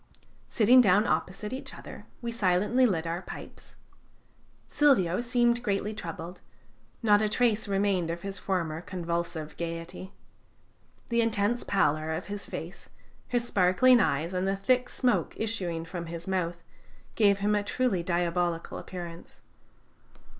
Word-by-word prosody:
Sitting 245 +3 +6
down 205 -1 +4
opposite 210 +3 -2
each 265 - -6
other, - - -11 0.2
we 235 - -2
silently 215 +4 +2
lit 170 -6 -1
our 170 +2 -3
pipes. - - -11 0.9
Silvio 235 - +3
seemed 240 0 +2
greatly 210 -1 -1
troubled; 175 -3 -7 0.6
not 205 -2 +5
a 215 - +1
trace 225 -1 +1
remained 195 -3 +1
of 170 +1 -4
his 195 -1 -5
former 165 -5 -2
convulsive 170 -3 -4
gayety. 170 +3 -6 1.0
The 235 0 +2
intense 230 +1 0
pallor 155 -4 +1
of 160 - -4
his 205 - -5
face, 175 +2 -8 0.4
his 240 -1 0
sparkling 235 +6 +4
eyes, 165 -2 0
and 185 +1 0
the 195 0 0
thick 250 +5 +1
smoke 240 -10 0
issuing 180 -7 -2
from 170 0 -6
his 170 +1 -7
mouth, 175 -3 -2 0.5
gave 200 -3 +4
him 205 +1 +1
a 205 - +2
truly 205 -2 0
diabolical 170 -1 -1
appearance. 175 -2 -9
190 Hz, 135 wpm, -28 LUFS, 170-220 Hz, 1.0 s, Sitting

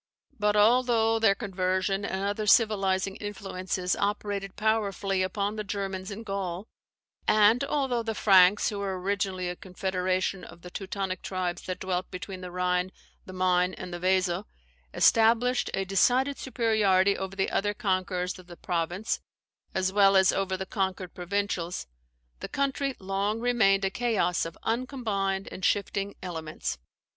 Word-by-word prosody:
But, 210 0 +2
although 225 0 +4
their 210 -3 +4
conversion 190 -1 -1
and 190 -1 -2
other 205 +1 -2
civilizing 195 -3 +3
influences 185 -3 -3
operated 200 -1 -2
powerfully 205 -3 0
upon 200 +3 -1
the 215 - -2
Germans 195 -2 -4
in 210 +2 -7
Gaul; 195 -1 -4 0.6
and 215 +4 +5
although 270 -5 0
the 225 -1 -3
Franks 190 -1 +5
(who 205 - -4
were 195 -2 -3
originally 190 -1 -1
a 175 - -3
confederation 185 0 -2
of 170 0 -13
the 180 - -9
Teutonic 195 -1 -4
tribes 185 -2 -3
that 185 -1 -3
dwelt 185 -1 -2
between 185 0 -7
the 180 - -6
Rhine, 180 +1 0 0.4
the 185 - -8
Maine, 180 0 +2
and 180 -1 -7
the 175 - -4
Weser) 185 +1 +1 0.5
established 230 - +3
a 195 - -1
decided 255 +8 +2
superiority 210 -6 +2
over 190 0 -5
the 195 - 0
other 205 +1 0
conquerors 185 -4 -1
of 180 - -14
the 175 -2 -11
province, 175 +5 -2 0.5
as 190 0 0
well 195 -1 +5
as 190 0 +6
over 190 -1 -1
the 190 - -4
conquered 190 -2 -3
provincials, 180 -1 -2 0.5
the - - -6
country 275 -1 -1
long 195 +3 -1
remained 210 -5 +3
a 190 - 0
chaos 215 -7 0
of 165 - -11
uncombined 220 -6 -1
and 185 - -8
shifting 200 0 0
elements. 160 - -4
195 Hz, 150 wpm, -28 LUFS, 185-210 Hz, 0.6 s, as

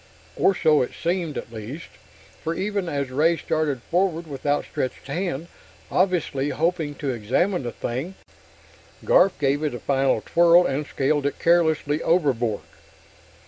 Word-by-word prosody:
Or 195 - +3
so 155 -3 +4
it 125 - -2
seemed, 170 -3 -1
at 115 - -7
least, 115 +9 -7 0.5
for 165 +1 -2
even 200 -2 -2
as 140 -3 -2
Ray 160 +5 +3
started 145 -5 -1
forward 175 -2 0
with 145 -2 -7
outstretched 145 -2 -2
hand, 165 +1 -3 0.5
obviously 170 -7 +1
hoping 160 -2 -1
to 140 -2 -3
examine 130 - 0
the 120 -2 -4
thing, 130 - -4 0.9
Garf 190 +1 +4
gave 140 0 +1
it 150 -5 -1
a - - -6
final 135 -1 +1
twirl 170 +1 +5
and 145 +2 -2
scaled 140 +1 0
it 145 - -4
carelessly 160 -3 +2
overboard. 130 - +1
150 Hz, 140 wpm, -24 LUFS, 135-170 Hz, 0.9 s, twirl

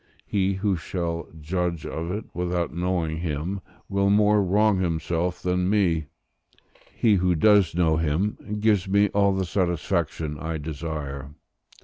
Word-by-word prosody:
He 100 -1 +1
who 95 -1 0
shall 85 -1 -3
judge 85 +1 -2
of 80 +1 -4
it 105 +4 -3
without 90 -2 -1
knowing 85 -2 -1
him, 85 +4 -3 0.3
will 100 0 +1
more 105 0 +4
wrong 105 +1 +3
himself 85 0 -1
than 90 0 +1
me; 85 -7 +2 0.8
he 110 -3 +2
who 90 -1 +2
does 100 -1 +4
know 80 -3 +3
him, 80 +6 0 0.2
gives 105 -3 +2
me 100 +1 +3
all 100 0 +3
the 95 -1 -1
satisfaction 85 -4 -1
I 80 0 -3
desire. 75 -2 -5
90 Hz, 135 wpm, -25 LUFS, 80-100 Hz, 0.8 s, more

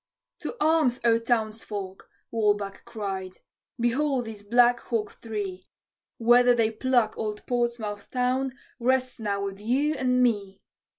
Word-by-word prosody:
"To - - -5
arms, 305 -6 +3
O 230 -1 +5
townsfolk!" 215 -4 -3 0.2
Walbach 205 -3 0
cried, 195 -5 -5 0.4
"Behold 255 +2 +1
these 220 -2 -8
black 240 +3 +4
hawk 225 -4 -3
three! 200 -5 -5 0.5
Whether 245 +1 +5
they 225 -2 +2
pluck 240 -1 +1
old 210 -1 -4
Portsmouth 235 -4 -2
town 255 +1 0 0.3
rests 255 +1 +1
now 200 -2 -1
with 195 0 -5
you 265 +8 +1
and 255 -3 +2
me. 200 -5 0
230 Hz, 125 wpm, -26 LUFS, 210-250 Hz, 0.5 s, O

